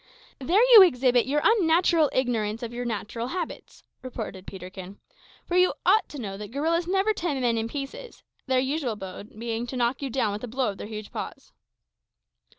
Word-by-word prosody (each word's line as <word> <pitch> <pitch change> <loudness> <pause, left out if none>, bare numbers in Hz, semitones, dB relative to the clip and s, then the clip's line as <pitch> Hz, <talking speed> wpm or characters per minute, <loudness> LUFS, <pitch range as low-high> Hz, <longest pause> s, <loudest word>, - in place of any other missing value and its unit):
"There 350 - +3
you 440 - +12
exhibit 250 -8 +4
your 295 +2 +1
unnatural 340 -6 +4
ignorance 230 -3 -1
of 235 0 -5
your 245 +1 -4
own - - -2
natural 230 +1 -4
habits," 345 +3 -6 0.2
retorted 220 -7 -7
Peterkin; 190 +1 -9 0.5
"for 350 - -3
you 365 0 +4
ought 405 +5 +4
to 295 - -8
know 195 -5 -5
that 205 0 -7
gorillas 325 +7 0
never 390 +3 +2
tear 335 -8 -2
men 240 -2 +1
in 225 0 -1
pieces 290 - -7 0.2
their 260 -1 +2
usual 265 -2 -1
mode 200 +1 -9
being 230 +1 -3
to 255 - -5
knock 240 +2 0
you 275 - -3
down 235 -4 0
with 205 +3 -6
a - - -3
blow 250 +1 -1
of 195 - -13
their - - -6
huge 215 -1 -7
paws." - - -7
250 Hz, 190 wpm, -26 LUFS, 220-320 Hz, 0.5 s, you